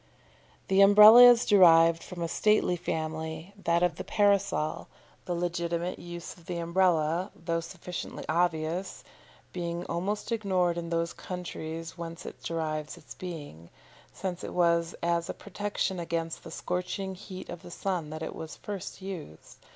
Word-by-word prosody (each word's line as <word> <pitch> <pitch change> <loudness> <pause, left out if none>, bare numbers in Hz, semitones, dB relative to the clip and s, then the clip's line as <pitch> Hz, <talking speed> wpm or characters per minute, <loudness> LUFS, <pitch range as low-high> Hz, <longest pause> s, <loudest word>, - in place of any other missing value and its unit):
The 195 +1 +4
Umbrella 210 +4 +10
is 245 -1 +7
derived 165 -4 +6
from 175 -2 -6
a - - -1
stately 210 0 +2
family, 160 +1 -4
that 170 +1 +3
of 180 - +1
the - - -4
Parasol, 200 -6 +1 0.4
the 175 - -2
legitimate 170 0 -2
use 175 0 -8
of 170 -2 -20
the 175 - -3
Umbrella, 170 0 +1
though 165 0 -2
sufficiently 170 +1 -7
obvious, 170 +1 -1 0.5
being 170 0 -3
almost 200 +7 -3
ignored 185 -6 +1
in 170 -1 -4
those 170 0 -1
countries 165 -2 -6
whence 165 0 -7
it - - -9
derives 155 -1 -3
its 160 - -12
being, 145 - -8 0.4
since 185 -2 -5
it - - -6
was 170 -1 +2
as 170 0 0
a - - -4
protection 205 -2 -3
against 165 -1 -3
the - - -9
scorching 180 +3 -3
heat 185 0 -9
of 170 - -7
the - - -11
sun 175 -3 -3
that 155 +1 -6
it - - -5
was 160 0 -7
first 200 -1 -7
used. 170 - -9
170 Hz, 150 wpm, -29 LUFS, 165-185 Hz, 0.5 s, Umbrella